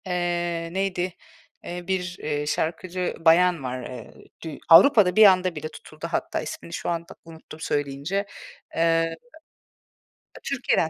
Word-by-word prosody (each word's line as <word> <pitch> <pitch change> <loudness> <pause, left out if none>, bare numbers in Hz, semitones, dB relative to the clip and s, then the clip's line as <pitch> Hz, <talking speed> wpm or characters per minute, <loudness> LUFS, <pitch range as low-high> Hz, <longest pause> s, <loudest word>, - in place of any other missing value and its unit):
Eee, 175 -2 -2
neydi, 185 -2 -1 0.5
eee, 175 0 -6
bir, 185 -1 -2
eee, 150 -1 -2
şarkıcı 175 +4 -2
bayan 170 -1 +4
var. 125 0 -4
Eee, 120 -2 -9 0.3
dü 160 -4 -6
Avrupa'da 185 +1 +7
bir 215 0 +8
anda 185 -2 +4
bir 150 - -7
de 155 - -3
tutuldu 155 +1 -9
hatta, - - -2
ismini 170 - -8
şu - - -3
anda 170 -1 -4
unuttum 160 -1 -12
söyleyince. 145 +6 -2 0.5
Eee, 165 0 +2 1.3
Türkiye'den, 255 -11 0
170 Hz, 130 wpm, -24 LUFS, 160-180 Hz, 1.3 s, bir